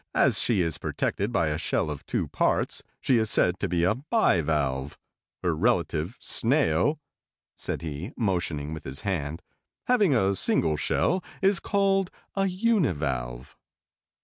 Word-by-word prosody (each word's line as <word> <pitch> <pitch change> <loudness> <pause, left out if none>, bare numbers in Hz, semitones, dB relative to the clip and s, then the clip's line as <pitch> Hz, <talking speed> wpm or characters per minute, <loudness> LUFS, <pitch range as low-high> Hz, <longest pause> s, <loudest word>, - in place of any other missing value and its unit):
As - - +3
she 110 -6 +2
is 80 -3 -2
protected 100 +4 -2
by 85 -9 +1
a 75 +1 -2
shell 80 - 0
of 75 - -8
two - - -1
parts, - - 0 0.2
she 125 -3 +3
is 110 -1 0
said 90 -2 +2
to 100 - -1
be 85 -1 +1
a 90 - +4
bi 140 - +2
valve. 70 -3 -1 0.5
Her 85 -2 +1
relative, 85 -1 0
Snail," 145 +3 +1 0.6
said - - -4
he, 80 - -5
motioning 85 - -1
with 80 - -7
his 65 +3 -6
hand, 85 -3 -3 0.4
"having 210 - +3
a 100 -4 +3
single 80 -4 +2
shell 180 - 0 0.2
is 195 -1 +4
called 195 -1 +1 0.3
a 195 0 +2
uni 195 - +2
valve." 65 -4 -4
90 Hz, 150 wpm, -27 LUFS, -, 0.6 s, a